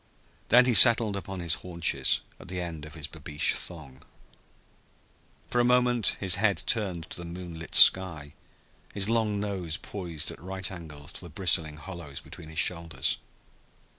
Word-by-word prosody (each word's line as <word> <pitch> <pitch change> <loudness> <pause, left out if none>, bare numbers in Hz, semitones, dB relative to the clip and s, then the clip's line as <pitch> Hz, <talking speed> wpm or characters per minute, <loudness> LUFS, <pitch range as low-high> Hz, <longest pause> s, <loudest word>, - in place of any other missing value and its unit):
Then 125 +2 +6
he 125 - +2
settled 115 -3 +6
upon 95 -1 -6
his 85 -2 +2
haunches 85 -2 0 0.2
at - - -13
the 90 +1 -5
end 85 -4 -6
of 75 +1 -12
his 80 -3 -7
babeesh 75 -1 -2
thong. 75 -7 -1 1.5
For 120 - +2
a - - +2
moment 125 -2 +2
his 95 -1 +1
head 105 -3 +2
turned 95 -7 -2
to - - -1
the - - -7
moonlit 85 -1 -8
sky, 85 -6 +5 0.6
his 100 +1 +3
long 110 -3 0
nose 95 -6 -2
poised 85 -6 -4
at - - -13
right 95 +2 -4
angles 80 -3 -10
to - - -7
the 85 - -11
bristling 80 -2 +1
hollows 75 -3 -8
between 80 - -12
his 80 - -11
shoulders. 85 -1 +2
90 Hz, 160 wpm, -27 LUFS, 80-100 Hz, 1.5 s, Then